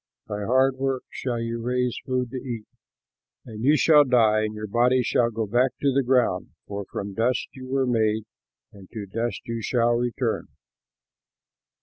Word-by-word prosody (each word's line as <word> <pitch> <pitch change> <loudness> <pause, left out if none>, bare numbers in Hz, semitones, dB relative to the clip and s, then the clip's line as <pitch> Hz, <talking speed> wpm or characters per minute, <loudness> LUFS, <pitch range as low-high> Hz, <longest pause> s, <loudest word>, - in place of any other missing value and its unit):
By 105 0 -4
hard 130 +3 +3
work 135 -1 -1
shall 120 -3 -3
you 115 0 -3
raise 125 0 0
food 125 -2 -1
to 130 - -4
eat. 120 -4 -5 0.8
And 110 -3 -8
you 150 +4 +5
shall 150 +2 +6
die 115 -5 +3
and 110 0 -5
your 105 0 -5
body 125 +4 +2 0.3
go 110 0 -2
back 120 +4 +2
to 140 -2 +2
the 140 - +3
ground, 125 -8 +1
for 100 -1 -5
from 100 +1 -6
dust 115 +5 0
you 130 -1 -10
were 135 0 +1
made, 110 -3 +1 0.5
and 95 -2 -14
to 110 -3 -5
dust 115 +5 -3
you 115 -1 -4
shall 120 +1 +2
return!" 120 -1 -1
120 Hz, 165 wpm, -25 LUFS, 110-130 Hz, 0.8 s, shall